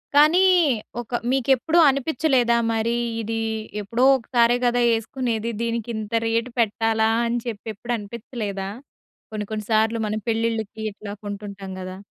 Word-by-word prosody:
కానీ! 305 +5 +6 0.6
ఒక 240 +1 -3
మీకెప్పుడూ 270 +5 +2
అనిపిచ్చలేదా 265 -3 +2
మరి 225 +1 0 0.3
ఇది 225 +1 -3 0.4
ఎప్పుడో 230 +5 -1
ఒకసారే 240 0 +2
గదా! 245 0 +2
యేసుకునేది. 230 0 -1
దీనికి 235 0 -2
ఇంత 215 0 -6
రేటు 230 +2 0
పెట్టాలా 220 0 +2 0.2
అని 235 +1 0
చెప్పి 220 -2 -6
ఎప్పుడు 240 +4 -4
అనిపిచలేదా? 205 -2 -5 0.6
కొన్ని 210 -1 -4
కొన్ని 215 -1 -3
సార్లు 220 +1 +2
మనం 215 +1 -2
పెళ్ళిళ్ళకి 225 -1 -1
ఇట్లా 205 0 -8
కొంటుంటాం 200 -1 -6
గదా! 185 0 -7
225 Hz, 130 wpm, -23 LUFS, 215-240 Hz, 0.6 s, కానీ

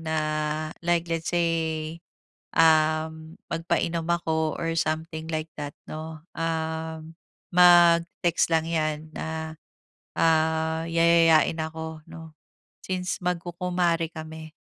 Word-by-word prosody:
na 160 -1 -2 0.6
like, 175 0 +1
let's 165 -1 -2
say 170 -1 +2 1.0
uhm, 160 0 +2 0.2
magpainom 165 0 -1
ako 160 -2 0
or 165 0 -2
something 160 0 -2
like 155 0 -3
that, 145 -1 -5
'no. 155 0 -7
Ah, 160 -1 -3 0.5
mag-text 175 -1 +5
lang 160 0 +1
yan 155 -1 -2
na 160 0 -5 0.6
ah, 160 0 +2
yayayain 165 -1 +4
ako, 160 0 -5
'no, 160 -1 -11 0.5
since 185 +1 -2
magkukumare 175 -1 -1
kami. 160 0 -9
160 Hz, 100 wpm, -26 LUFS, 160-170 Hz, 1.0 s, mag-text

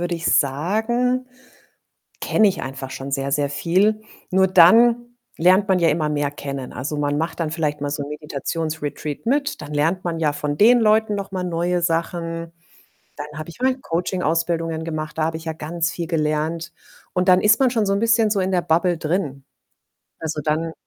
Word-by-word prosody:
würde 175 0 -1
ich 165 0 -6
sagen, 220 - +1 0.9
kenne 215 -2 +3
ich 190 - -3
einfach 135 0 -6
schon 135 +1 -6
sehr, 135 0 -1
sehr 140 0 0
viel. 190 +8 +1 0.3
Nur 190 +1 +4
dann 235 +7 +5 0.2
lernt 185 +4 +4
man 190 -1 +3
ja 170 -2 +3
immer 155 0 0
mehr 145 -1 -1
kennen. 140 -2 -6
Also, 145 +4 -4
man 145 0 0
macht 165 +2 -3
dann 160 -2 -1
vielleicht 150 -2 -2
mal 145 - -2
so 145 0 -3
’n - - -8
Meditations-Retreat 150 +2 -4
mit, 285 +4 0
dann 150 0 -7
lernt 165 +5 +1
man 170 -2 -2
ja 155 -2 +1
von 145 0 -3
den 235 +7 +6
Leuten 215 -1 +3
noch 200 -1 -4
mal 185 -1 -3
neue 175 0 -1
Sachen, 165 0 -2 0.6
dann 150 0 -7
habe 155 - -7
ich 170 - -11
mal 260 0 +2
Coaching-Ausbildungen 165 - -1
gemacht, 155 -1 -5
da 160 - +1
habe 160 0 -2
ich 160 - -12
ja 160 - -1
ganz 165 +2 -2
viel 170 -1 -4
gelernt. 160 +1 -1 0.4
Und 180 +1 0
dann 180 0 +6
ist 210 +2 +4
man 260 -2 +3
schon 225 -4 0
so 195 - +1
’n 200 - 0
bisschen 230 -1 +3
so 205 -2 +1
in 185 0 0
der 180 - +2
Bubble 170 +1 +1
drin. 150 -5 -2 0.8
Also, 155 -1 -3
dann 160 +2 -1
165 Hz, 195 wpm, -21 LUFS, 150-190 Hz, 0.9 s, den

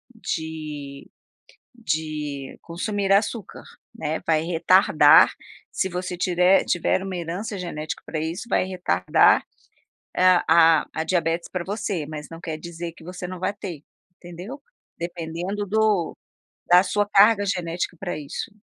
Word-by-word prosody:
de 155 -7 -6 0.6
de 155 - -4
consumir 195 +3 -2
açúcar, 210 0 -1 0.3
né, 160 -7 -3
vai 160 -1 +2
retardar, 180 +3 +5 0.4
se 190 - -1
você 180 0 -4
tirer 180 +1 +3
tiver 175 +2 +1
uma 190 -1 -5
herança 180 +5 -4
genética 160 -4 -5
para 155 - -4
isso, 165 +6 -3
vai - - +2
retardar, 175 - +3 0.7
ah, 185 -1 +5
a 165 -2 +5
a 160 - 0
diabetes 170 -1 0
para 180 -2 -2
você, 195 -5 -3
mas 150 -1 -7
não 165 - -9
quer 160 -3 -4
dizer 170 0 -7
que 165 - -16
você 180 +1 -6
não 185 0 -7
vai 185 +2 -1
ter, 180 -7 -8 0.3
entendeu. 180 +10 -9 0.3
Dependendo 175 +4 -4
do 210 -4 +1 0.5
da 180 +1 +7
sua 205 0 0
carga 205 +1 +5
genética 180 -2 -2
para 175 -3 -4
isso. 145 +8 -6
175 Hz, 135 wpm, -24 LUFS, 160-195 Hz, 0.7 s, da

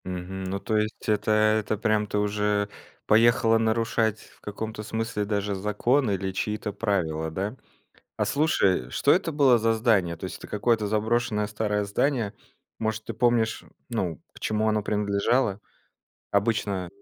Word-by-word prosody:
Мгм. 95 +1 -5
Ну 95 +1 -3
то 110 +3 -1
есть 105 0 -2
это 105 0 +1
это 110 0 +2
прям 110 0 +1
ты 105 - -2
уже 105 0 0 0.4
поехала 115 0 +4
нарушать 110 -1 +1
в - - -19
каком-то 105 +1 -5
смысле 110 -1 -2
даже 100 -1 -1
закон 105 +6 +1
или 95 -1 -1
чьи-то 105 +3 -3
правила, 85 -7 -1
да? 100 +8 -3 0.6
А - - +1
слушай, 100 - +2
что 140 - +1
это 170 -2 +1
было 135 -5 +5
за 115 0 +2
здание? 110 -7 +2
То - - -9
есть, - - -5
это - - -10
какое-то 105 +1 +1
заброшенное 110 0 0
старое 105 -1 -1
здание? 115 +1 0 0.4
Может 110 0 -2
ты - - -5
помнишь, 120 -2 +1 0.2
ну 95 -9 -2
к - - -14
чему 110 0 0
оно 105 -1 +1
принадлежало? 105 +2 +1 0.7
Обычно 100 -3 0
105 Hz, 150 wpm, -26 LUFS, 100-115 Hz, 0.7 s, было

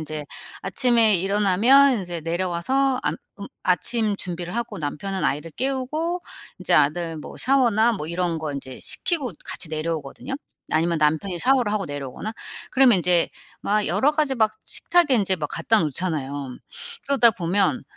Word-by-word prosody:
인제 155 -1 -6 0.3
아침에 235 -4 +3
일어나면 210 +8 +4
인제 175 -2 -5
내려와서 185 - 0
암 - - -1 0.2
음 200 - -6 0.2
아침 215 +4 +1
준비를 175 -2 -5
하고 235 0 -3
남편은 185 +6 -3
아이를 150 +4 -2
깨우고 275 - -2 0.4
인제 - - +1
아들 160 +3 +2
뭐 155 - -9
샤워나 240 -4 +3
뭐 175 -9 -4
이런 170 0 -1
거 155 -2 -4
이제 130 -2 -7
시키고 290 - 0
같이 170 - -4
내려오거든요. 155 - -4 0.4
아니면 165 +1 +1
남편이 160 +5 0
샤워를 250 0 +2
하고 205 -3 -1
내려오거나. 145 - -6 0.4
그러면 255 -6 +6
인제 175 0 +2 0.3
막 210 0 +1
여러 290 +3 +2
가지 300 -3 0
막 220 -3 +2
식탁에 345 -6 +2
인제 195 -5 +2
막 155 -4 -3
갖다 225 - +2
놓잖아요. 145 -4 -3 0.5
그러다 270 -4 +5
보면 195 +4 0
190 Hz, 340 characters per minute, -23 LUFS, 160-245 Hz, 0.5 s, 그러면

